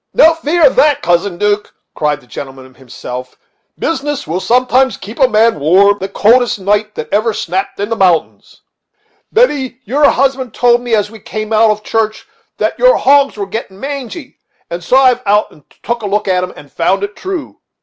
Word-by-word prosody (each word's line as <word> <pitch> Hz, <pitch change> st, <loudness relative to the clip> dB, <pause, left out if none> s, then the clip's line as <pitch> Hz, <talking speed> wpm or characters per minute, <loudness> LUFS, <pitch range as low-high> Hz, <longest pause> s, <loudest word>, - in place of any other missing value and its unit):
"No 330 Hz, -8 st, +6 dB
fear 325 Hz, +1 st, +1 dB
of 265 Hz, -, +4 dB
that, 295 Hz, -1 st, +3 dB
Cousin 175 Hz, +1 st, 0 dB
'Duke," 205 Hz, +1 st, -1 dB, 0.2 s
cried 150 Hz, -1 st, -1 dB
the -, -, -21 dB
gentleman 130 Hz, 0 st, -10 dB
himself; 125 Hz, 0 st, -9 dB, 0.4 s
"business 290 Hz, -2 st, -3 dB
will 170 Hz, +4 st, -3 dB
sometimes 255 Hz, +4 st, +2 dB
keep 215 Hz, +5 st, -10 dB
a 265 Hz, -, +5 dB
man 225 Hz, -5 st, +2 dB
warm 195 Hz, +7 st, +3 dB
the 195 Hz, -, -4 dB
coldest 235 Hz, +5 st, +3 dB
night 210 Hz, +2 st, -1 dB
that -, -, -5 dB
ever 215 Hz, +1 st, +1 dB
snapt 195 Hz, -2 st, -3 dB
in 205 Hz, +1 st, -2 dB
the 230 Hz, -, -1 dB
mountains. 180 Hz, -6 st, 0 dB, 0.7 s
Betty, 285 Hz, -, +1 dB
your 285 Hz, +7 st, +3 dB
husband 265 Hz, -2 st, 0 dB
told 240 Hz, 0 st, +3 dB
me, 240 Hz, -2 st, 0 dB
as 210 Hz, 0 st, -1 dB
we 225 Hz, -, -12 dB
came 215 Hz, +2 st, -5 dB
out 220 Hz, +1 st, +4 dB
of 215 Hz, 0 st, -1 dB
church, 220 Hz, 0 st, -2 dB, 0.3 s
that -, -, -2 dB
your -, -, +5 dB
hogs 280 Hz, -2 st, +3 dB
were 200 Hz, -, -3 dB
getting 195 Hz, -1 st, -7 dB
mangy, 275 Hz, +1 st, -7 dB, 0.3 s
and 170 Hz, +1 st, -5 dB
so 255 Hz, -, +2 dB
I 265 Hz, -1 st, +6 dB
have 250 Hz, 0 st, -2 dB
been 200 Hz, -, 0 dB
out 210 Hz, +1 st, +2 dB
to 150 Hz, -, -20 dB, 0.2 s
take 235 Hz, 0 st, -2 dB
a 210 Hz, -, -4 dB
look 210 Hz, +1 st, -1 dB
at 185 Hz, -1 st, +1 dB
them, 180 Hz, -, -5 dB
and 145 Hz, -, -14 dB
found 190 Hz, +4 st, 0 dB
it 205 Hz, +1 st, -4 dB
true. 370 Hz, -5 st, -6 dB
215 Hz, 200 wpm, -14 LUFS, 190-260 Hz, 0.7 s, No